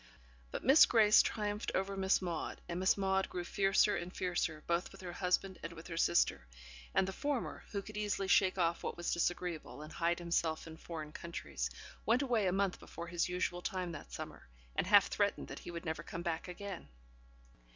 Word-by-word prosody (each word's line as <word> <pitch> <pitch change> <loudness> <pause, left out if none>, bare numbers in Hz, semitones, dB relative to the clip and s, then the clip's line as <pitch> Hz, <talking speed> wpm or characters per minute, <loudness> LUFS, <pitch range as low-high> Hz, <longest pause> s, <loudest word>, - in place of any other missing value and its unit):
But - - -5
Miss 270 +5 +8
Grace 215 -2 +7
triumphed 210 0 -2
over 195 +1 0
Miss 190 0 +2
Maude, 170 -3 -3
and 175 0 -3
Miss 185 +2 +3
Maude 190 -1 +1
grew 180 - -3
fiercer 195 +3 +3
and 175 +1 -4
fiercer, 175 -4 -1
both 170 +2 0
with 195 - -12
her 175 -2 -6
husband 185 +1 0
and 165 - -6
with 160 0 -11
her 170 - -6
sister; 85 - +2 0.5
and 190 - +4
the 190 - -3
former 285 +2 -2
who 200 -2 -3
could 215 - -10
easily 205 -2 -1
shake 190 -1 +4
off 170 -1 +1
what - - -4
was 175 - -1
disagreeable, 170 -3 -2
and 155 - -10
hide 170 0 +1
himself 170 -2 0
in 160 -1 -9
foreign 160 -2 -7
countries 75 - -4 0.3
went 240 +5 +3
away 235 -7 +2
a - - +3
month 195 0 0
before 170 - -8
his 175 0 0
usual 180 0 -1
time 185 -1 -2
that 150 - -9
summer, - - -7 0.3
and - - 0
half - - +7
threatened 70 - 0
that - - -6
he - - -9
would 170 +1 -6
never 160 -1 -2
come 170 - -6
back 170 -1 -2
again. 185 - -6
180 Hz, 200 wpm, -35 LUFS, 170-195 Hz, 0.5 s, Miss